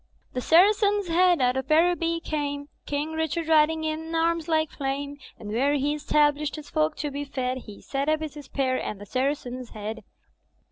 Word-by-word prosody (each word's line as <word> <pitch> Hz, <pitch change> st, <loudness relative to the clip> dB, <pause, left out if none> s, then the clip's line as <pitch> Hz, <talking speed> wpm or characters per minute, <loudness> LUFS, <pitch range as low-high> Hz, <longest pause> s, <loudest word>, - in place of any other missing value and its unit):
"The 250 Hz, -, -2 dB
Saracen's 405 Hz, -, +4 dB
Head 355 Hz, -1 st, +4 dB
out 250 Hz, 0 st, +3 dB
of 265 Hz, -, -3 dB
Araby 335 Hz, +1 st, +3 dB
came. 285 Hz, -1 st, -3 dB, 0.2 s
King 290 Hz, +2 st, -2 dB
Richard 320 Hz, 0 st, -2 dB
riding 315 Hz, 0 st, +4 dB
in 320 Hz, +1 st, -3 dB
arms 330 Hz, 0 st, +1 dB
like 315 Hz, -2 st, +1 dB
flame. 280 Hz, +1 st, -3 dB, 0.2 s
And 210 Hz, -, -8 dB
where 275 Hz, +6 st, +2 dB
he 290 Hz, +1 st, +1 dB
established 295 Hz, 0 st, +1 dB
his 305 Hz, -2 st, -10 dB
folk 155 Hz, 0 st, +1 dB
to 295 Hz, -1 st, -3 dB
be 285 Hz, +1 st, -3 dB
fed 260 Hz, -2 st, -3 dB
He 205 Hz, -1 st, -10 dB
set 275 Hz, +2 st, -2 dB
up 310 Hz, 0 st, +2 dB
his 310 Hz, -2 st, -5 dB
spear 270 Hz, -3 st, -2 dB
— -, -, -4 dB
^and 210 Hz, -, -4 dB
the 205 Hz, -, -10 dB
Saracen's 255 Hz, +1 st, -2 dB
Head. 215 Hz, +1 st, -6 dB
295 Hz, 185 wpm, -26 LUFS, 270-320 Hz, 0.2 s, Saracen's